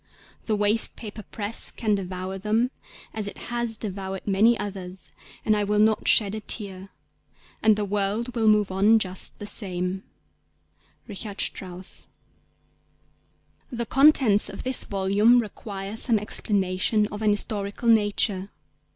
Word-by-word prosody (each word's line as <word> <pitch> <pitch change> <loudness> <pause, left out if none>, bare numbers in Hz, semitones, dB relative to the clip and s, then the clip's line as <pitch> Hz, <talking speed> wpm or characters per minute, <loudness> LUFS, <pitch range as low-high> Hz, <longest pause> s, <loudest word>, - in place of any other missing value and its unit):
The 220 - +1
waste 210 +2 +2
paper 215 -1 -8
press 210 +2 -4
can 215 -2 -1
devour 190 0 -4
them 220 +5 0 0.4
as 215 -2 -3
it - - -7 0.2
has 235 -2 -1
devoured 195 -2 -5
many 210 +4 +3
others, 190 -2 -6 0.3
and 215 - +3
I 210 - 0
will 210 +1 0
not 215 +1 +2
shed 205 -2 +4
a 220 - -3
tear... 195 -3 -5 0.7
and 215 -1 +5
the 210 0 -2
world 205 +4 -1
will 225 -2 +1
move 210 -2 +3
on 205 +4 +4
just 190 -3 -2
the 205 - -7
same."'—RICHARD 195 +2 -7
STRAUSS. 185 0 -5 1.6
THE 235 -1 -3
contents 265 -6 +5
of - - -8
this 260 -1 +2
volume 200 +4 +3
require 205 -2 -6
some 225 0 +3
explanation 205 0 +1
of 210 - -7
an 215 - +2
historical 205 +1 -1
nature. 205 -3 +2
205 Hz, 135 wpm, -25 LUFS, 195-220 Hz, 1.6 s, and